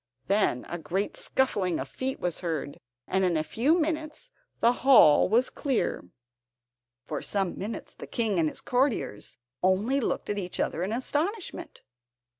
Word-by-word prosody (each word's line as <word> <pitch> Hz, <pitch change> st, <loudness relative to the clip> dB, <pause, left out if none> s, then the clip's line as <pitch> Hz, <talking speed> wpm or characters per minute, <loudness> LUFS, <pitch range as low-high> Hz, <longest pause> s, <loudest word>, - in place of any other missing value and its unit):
Then 195 Hz, -, +1 dB
a 175 Hz, -, -5 dB
great 190 Hz, +5 st, -2 dB
scuffling 200 Hz, -10 st, 0 dB
of 130 Hz, -, -4 dB
feet 260 Hz, -, -3 dB
was 175 Hz, -2 st, -2 dB
heard, 160 Hz, -5 st, -4 dB, 0.3 s
and 190 Hz, 0 st, +1 dB
in 175 Hz, -3 st, +2 dB
a 155 Hz, -, 0 dB
few 280 Hz, -, +2 dB
minutes 315 Hz, +8 st, -3 dB, 0.3 s
the 235 Hz, -, +5 dB
hall 250 Hz, -, +7 dB
was 240 Hz, +5 st, +3 dB
clear. 260 Hz, -, -1 dB, 1.0 s
For 150 Hz, -, -4 dB
some 195 Hz, -3 st, -1 dB
minutes 210 Hz, +4 st, -6 dB
the -, -, -10 dB
King 215 Hz, -6 st, 0 dB
and 160 Hz, -2 st, +2 dB
his -, -, -8 dB
courtiers 245 Hz, -, -1 dB, 0.2 s
only 200 Hz, +9 st, +2 dB
looked 255 Hz, -, -2 dB
at 205 Hz, 0 st, -1 dB
each 180 Hz, -2 st, -6 dB
other 165 Hz, -, -1 dB
in 190 Hz, +3 st, -1 dB
astonishment. 335 Hz, -, -3 dB
205 Hz, 155 wpm, -28 LUFS, 175-265 Hz, 1.0 s, hall